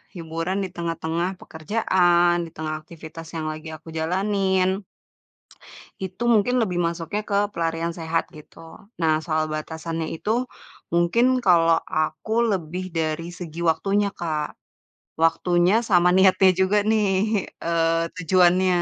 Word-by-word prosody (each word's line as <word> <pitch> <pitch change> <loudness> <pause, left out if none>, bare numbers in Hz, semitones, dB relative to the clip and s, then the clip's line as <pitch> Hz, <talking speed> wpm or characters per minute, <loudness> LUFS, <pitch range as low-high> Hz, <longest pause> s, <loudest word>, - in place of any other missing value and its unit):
hiburan 165 +3 -3
di 190 - -4
tengah-tengah 170 +1 -2
pekerjaan, 175 0 +2
di - - -10
tengah 155 0 -3
aktivitas 160 0 -11
yang 160 -1 -3
lagi 155 +1 -8
aku 155 +2 -17
jalanin. 190 +2 +1 1.3
Itu 190 +4 -5
mungkin 230 +3 +3
lebih 190 -8 0
masuknya 170 +4 -2
ke 200 - 0 0.2
pelarian 165 0 -2
sehat 165 -1 -2
gitu. 160 +1 -14 0.2
Nah 160 -2 +1
soal 155 0 -1
batasannya 160 +1 -4
itu, 235 +8 -1 0.4
mungkin 235 +10 +2
kalo 165 -3 +5
aku 185 +8 -1
lebih 185 0 -3
dari 165 -1 -2
segi 170 -2 -8
waktunya 195 +5 +1
Kak, 160 -6 -4 0.6
waktunya 175 +6 +3
sama 180 -4 +4
niatnya 190 0 +5
juga 195 +2 +3
nih, 215 +1 +2 0.6
eee, 165 0 +1
tujuannya. 180 +1 +3
170 Hz, 120 wpm, -23 LUFS, 165-190 Hz, 1.3 s, kalo